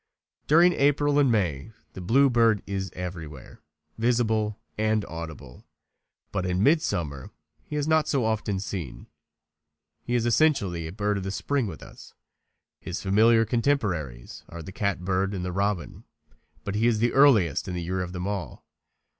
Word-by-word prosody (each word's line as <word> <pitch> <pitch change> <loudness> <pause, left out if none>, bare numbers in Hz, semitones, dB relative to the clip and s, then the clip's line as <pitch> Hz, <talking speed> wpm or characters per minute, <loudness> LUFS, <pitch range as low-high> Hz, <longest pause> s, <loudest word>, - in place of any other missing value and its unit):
During 170 +4 +6
April 145 0 +2
and 135 -4 +4
May 95 -2 -1 0.2
the 95 - -8
bluebird 115 0 +3
is 95 -1 -3
everywhere 85 -7 -8 0.4
visible 110 -3 +1 0.2
and 110 -1 0
audible, 80 -6 -9 0.6
but 95 -3 -2
in 90 +1 0
midsummer 85 - 0 0.3
he 150 - -8
is 150 0 -1
not 160 -1 +3
so 135 -5 +1
often 105 -3 -1
seen. 95 -8 -6 1.0
He 120 - -2
is 120 -1 +1
essentially 105 - +2
a - - -7
bird 105 +1 -1
of - - -6
the 95 - -3
spring 130 +5 -1
with 85 -6 -8
us. - - -14 0.6
His 90 - -5
familiar 115 +4 +4
contemporaries 100 - -2
are 85 0 -8
the 95 - -9
catbird 95 0 -1
and 90 -1 -4
the 90 - -3
robin, 100 -1 -2 0.6
but 100 - -4
he 110 +3 +2
is 115 -2 +2
the 120 +2 +1
earliest 115 - +4
in 90 - -4
the 90 - -3
year 95 +2 -2
of 90 -1 -4
them 90 0 -5
all. 95 -9 -5
100 Hz, 155 wpm, -26 LUFS, 90-120 Hz, 1.0 s, During